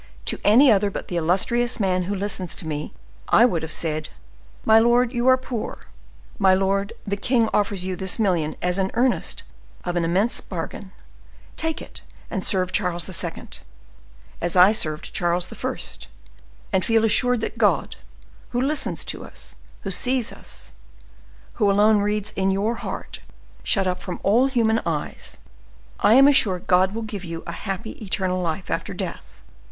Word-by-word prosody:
To -, -, +1 dB
any 245 Hz, +7 st, +6 dB
other 205 Hz, -1 st, +3 dB
but -, -, -7 dB
the 175 Hz, -, -4 dB
illustrious 215 Hz, +9 st, +1 dB
man 185 Hz, -3 st, +1 dB
who 200 Hz, +2 st, -2 dB
listens 190 Hz, -3 st, -3 dB
to 185 Hz, -, -4 dB
me, 150 Hz, -1 st, -4 dB, 0.4 s
I 235 Hz, -, +6 dB
would 175 Hz, -10 st, 0 dB
have 160 Hz, -, -5 dB
said: 155 Hz, -2 st, -2 dB, 0.6 s
'My 220 Hz, 0 st, +7 dB
lord, 240 Hz, +2 st, +3 dB
you 240 Hz, +1 st, 0 dB
are 260 Hz, 0 st, +6 dB
poor; 255 Hz, -3 st, -5 dB, 0.6 s
my 190 Hz, -2 st, +5 dB
lord, 195 Hz, +2 st, 0 dB
the 200 Hz, -1 st, -1 dB
king 230 Hz, +3 st, +1 dB
offers 200 Hz, -3 st, 0 dB
you 185 Hz, 0 st, -2 dB
this 190 Hz, 0 st, 0 dB
million 175 Hz, -8 st, 0 dB
as 180 Hz, +2 st, +1 dB
an 190 Hz, 0 st, +1 dB
earnest 245 Hz, +1 st, +1 dB, 0.4 s
of 175 Hz, -1 st, -3 dB
an 175 Hz, -, +1 dB
immense 190 Hz, +8 st, +1 dB
bargain; 190 Hz, +2 st, -6 dB, 0.6 s
take 320 Hz, -1 st, -3 dB
it, -, -, -10 dB, 0.3 s
and 190 Hz, -4 st, -2 dB
serve 185 Hz, -2 st, +1 dB
Charles 180 Hz, -3 st, 0 dB, 0.2 s
II. 170 Hz, -1 st, -6 dB, 0.9 s
as 175 Hz, +1 st, -1 dB
I 185 Hz, +2 st, +8 dB
served 155 Hz, -8 st, -2 dB
Charles 175 Hz, 0 st, -1 dB
I., -, -, -3 dB, 1.0 s
and 185 Hz, -, +2 dB
I -, -, -3 dB
feel 225 Hz, -1 st, +3 dB
assured 245 Hz, +2 st, +2 dB
that -, -, -4 dB
God, -, -, +1 dB, 0.5 s
who 245 Hz, -, -1 dB
listens 270 Hz, -, 0 dB
to -, -, -2 dB
us, -, -, -8 dB, 0.3 s
who 195 Hz, -, -4 dB
sees 245 Hz, +5 st, +1 dB
us, 65 Hz, +1 st, -8 dB, 0.9 s
who 205 Hz, -, +5 dB
alone 210 Hz, +2 st, +4 dB
reads 210 Hz, 0 st, 0 dB
in 190 Hz, 0 st, +1 dB
your 200 Hz, +4 st, +1 dB
heart, 235 Hz, -, -6 dB, 0.4 s
shut 195 Hz, -3 st, +2 dB
up 180 Hz, -1 st, -1 dB
from 180 Hz, -1 st, -6 dB
all 235 Hz, +7 st, +4 dB
human 230 Hz, -4 st, +2 dB
eyes,—I 65 Hz, -, -3 dB
am 270 Hz, +2 st, +8 dB
assured 205 Hz, -11 st, +3 dB
God 185 Hz, +2 st, +3 dB
will 230 Hz, -, -3 dB
give 210 Hz, -3 st, -6 dB
you 165 Hz, -1 st, -6 dB
a 170 Hz, -, -5 dB
happy 195 Hz, +5 st, -6 dB
eternal 185 Hz, -2 st, -1 dB
life 170 Hz, +1 st, -3 dB
after -, -, -3 dB
death. -, -, -7 dB
195 Hz, 170 wpm, -23 LUFS, 180-225 Hz, 1.0 s, I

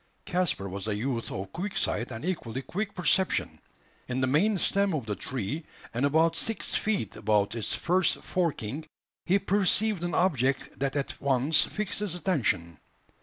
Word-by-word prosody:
Caspar 175 Hz, -, 0 dB
was 100 Hz, +2 st, -4 dB
a 105 Hz, -, 0 dB
youth 115 Hz, +2 st, -2 dB
of 95 Hz, 0 st, -5 dB
quick 190 Hz, +4 st, -3 dB
sight 120 Hz, -, 0 dB
and 115 Hz, +2 st, -6 dB
equally 135 Hz, -8 st, -3 dB
quick 200 Hz, +9 st, -3 dB
perception. 190 Hz, +1 st, +1 dB, 0.5 s
In 125 Hz, +1 st, -2 dB
the 130 Hz, -, +3 dB
main 190 Hz, +11 st, +3 dB
stem 200 Hz, 0 st, +2 dB
of 135 Hz, -7 st, -3 dB
the 105 Hz, -1 st, -2 dB
tree, 130 Hz, -, -3 dB, 0.3 s
and 125 Hz, +5 st, +2 dB
about 160 Hz, +3 st, +3 dB
six 225 Hz, +5 st, -1 dB
feet 200 Hz, -, -1 dB
above 105 Hz, -1 st, +1 dB
its 115 Hz, -2 st, -2 dB
first 180 Hz, 0 st, +2 dB
forking, 155 Hz, -, -2 dB, 0.4 s
he 190 Hz, -, +5 dB
perceived 200 Hz, 0 st, +3 dB
an 175 Hz, 0 st, -1 dB
object 135 Hz, -7 st, +1 dB
that 135 Hz, 0 st, -1 dB
at 140 Hz, -1 st, -3 dB
once 140 Hz, +3 st, +4 dB
fixed 210 Hz, -3 st, -3 dB
his 205 Hz, -4 st, -2 dB
attention. 110 Hz, -, 0 dB
150 Hz, 165 wpm, -28 LUFS, 115-185 Hz, 0.5 s, he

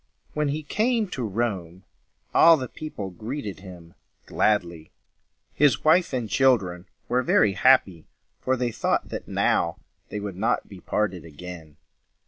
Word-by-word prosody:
When 150 Hz, -1 st, 0 dB
he 150 Hz, +2 st, -2 dB
came 220 Hz, -, 0 dB
to 130 Hz, -, -5 dB
Rome, 95 Hz, -5 st, -3 dB, 0.5 s
all 165 Hz, -1 st, +7 dB
the 130 Hz, -3 st, -4 dB
people 110 Hz, -10 st, -7 dB
greeted 110 Hz, +3 st, -6 dB
him 90 Hz, -3 st, -12 dB, 0.3 s
gladly. 85 Hz, -6 st, 0 dB, 0.6 s
His 145 Hz, -1 st, +3 dB
wife 170 Hz, +3 st, +4 dB
and 125 Hz, -4 st, -2 dB
children 100 Hz, -7 st, +1 dB, 0.2 s
were 125 Hz, +1 st, +1 dB
very 110 Hz, -5 st, +3 dB
happy, 95 Hz, -10 st, +3 dB, 0.3 s
for 130 Hz, 0 st, 0 dB
they 120 Hz, -1 st, -1 dB
thought -, -, -1 dB
that -, -, -6 dB
now -, -, +1 dB, 0.3 s
they 105 Hz, -, -4 dB
would 100 Hz, -3 st, -6 dB
not 110 Hz, +4 st, 0 dB
be 95 Hz, -, -12 dB
parted 95 Hz, -3 st, -2 dB
again. 80 Hz, -1 st, -10 dB
105 Hz, 140 wpm, -25 LUFS, 90-135 Hz, 0.6 s, all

